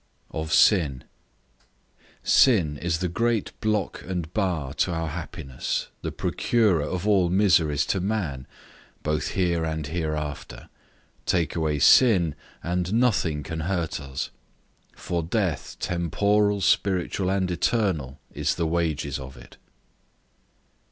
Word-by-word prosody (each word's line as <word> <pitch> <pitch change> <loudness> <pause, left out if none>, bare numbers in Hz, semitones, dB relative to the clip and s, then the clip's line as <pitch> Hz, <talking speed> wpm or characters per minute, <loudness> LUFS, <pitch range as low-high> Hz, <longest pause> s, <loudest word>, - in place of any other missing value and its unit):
OF 80 0 -4
SIN. 85 - +4 1.2
SIN 90 - +4
is 85 -2 0
the 90 - +1
great 115 +4 0
block 105 -2 -1
and 90 -3 -5
bar 85 -10 -1
to 90 - 0
our 80 -1 -2
happiness, 65 -3 -4
the - - -3
procurer 105 -9 +1
of 90 +7 -3
all 95 -4 +3
miseries 80 -6 +3
to 95 - 0
man, 90 -10 -2 0.6
both 75 -1 -1
here 85 -3 +1
and 80 -1 -2
hereafter; 75 -6 -4 0.6
take 85 -3 +1
away 80 -3 0
sin, 90 - +5 0.3
and 90 +3 -1
nothing 90 -11 +1
can 80 +1 -5
hurt 85 -1 -2
us; 70 -1 -5 0.6
for 85 -1 -2
death 90 -1 -2
temporal, 100 +4 +1
spiritual, 95 -1 +1
and 95 -1 0
eternal, 85 - 0
is - - 0
the 85 - -1
wages 80 -4 -1
of 65 -1 -9
it. - - -15
85 Hz, 120 wpm, -25 LUFS, 75-95 Hz, 1.2 s, sin